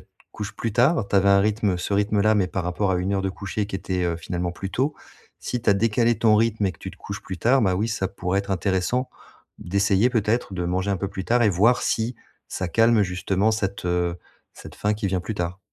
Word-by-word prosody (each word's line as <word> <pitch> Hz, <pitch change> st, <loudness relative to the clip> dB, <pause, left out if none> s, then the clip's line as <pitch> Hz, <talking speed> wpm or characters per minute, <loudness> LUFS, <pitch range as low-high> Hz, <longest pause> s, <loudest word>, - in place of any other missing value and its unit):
te -, -, -21 dB, 0.3 s
couches 105 Hz, -1 st, -6 dB
plus 115 Hz, -3 st, -3 dB
tard. 125 Hz, -1 st, +3 dB
Tu 100 Hz, -, +1 dB
avais 100 Hz, +1 st, +4 dB
un 100 Hz, 0 st, +6 dB
rythme, 105 Hz, -3 st, +1 dB
ce 100 Hz, -, -2 dB
rythme 105 Hz, 0 st, +1 dB
là, 110 Hz, +1 st, +4 dB
mais 95 Hz, -3 st, +2 dB
par 90 Hz, 0 st, -3 dB
rapport 90 Hz, +3 st, -1 dB
à 90 Hz, -, +2 dB
une 95 Hz, +2 st, -1 dB
heure 95 Hz, -, 0 dB
de 95 Hz, -, -1 dB
coucher 100 Hz, +2 st, -4 dB
qui 100 Hz, -, -8 dB
était, 90 Hz, -1 st, -3 dB
heu, 85 Hz, -1 st, -1 dB
finalement 90 Hz, +1 st, -3 dB
plus 95 Hz, +2 st, -6 dB
tôt, 140 Hz, +4 st, 0 dB, 0.4 s
si 125 Hz, -2 st, -4 dB
tu -, -, +3 dB
as -, -, +7 dB
décalé 115 Hz, +2 st, +2 dB
ton 110 Hz, -2 st, +4 dB
rythme 110 Hz, -2 st, +1 dB
et 95 Hz, -, -1 dB
que -, -, -21 dB
tu -, -, -7 dB
te -, -, -16 dB
couches -, -, -7 dB
plus 95 Hz, -, -7 dB
tard, 130 Hz, +5 st, +3 dB
ben 95 Hz, -2 st, +2 dB
oui 105 Hz, +5 st, -1 dB
ça 100 Hz, -3 st, -1 dB
pourrait 95 Hz, 0 st, -2 dB
être 100 Hz, -, -9 dB
intéressant, 95 Hz, +7 st, 0 dB, 0.5 s
d'essayer, 100 Hz, +5 st, +2 dB
peut-être, 115 Hz, -2 st, 0 dB
de 90 Hz, -1 st, -3 dB
manger 95 Hz, +3 st, -1 dB
un 100 Hz, -, +1 dB
peu 100 Hz, -, -2 dB
plus 95 Hz, -1 st, -6 dB
tard 120 Hz, +1 st, +2 dB
et 110 Hz, -, +5 dB
voir 105 Hz, +7 st, +3 dB
si, 115 Hz, +1 st, -1 dB, 0.3 s
ça 95 Hz, -, -3 dB
calme 115 Hz, +2 st, +4 dB
justement 95 Hz, +3 st, 0 dB
cette, 100 Hz, -4 st, -2 dB
heu, 90 Hz, 0 st, 0 dB, 0.4 s
cette -, -, -12 dB
faim 105 Hz, +1 st, 0 dB
qui 105 Hz, -1 st, -3 dB
vient 95 Hz, -1 st, 0 dB
plus 110 Hz, +4 st, -5 dB
tard. 90 Hz, 0 st, -3 dB
100 Hz, 250 wpm, -24 LUFS, 95-110 Hz, 0.5 s, as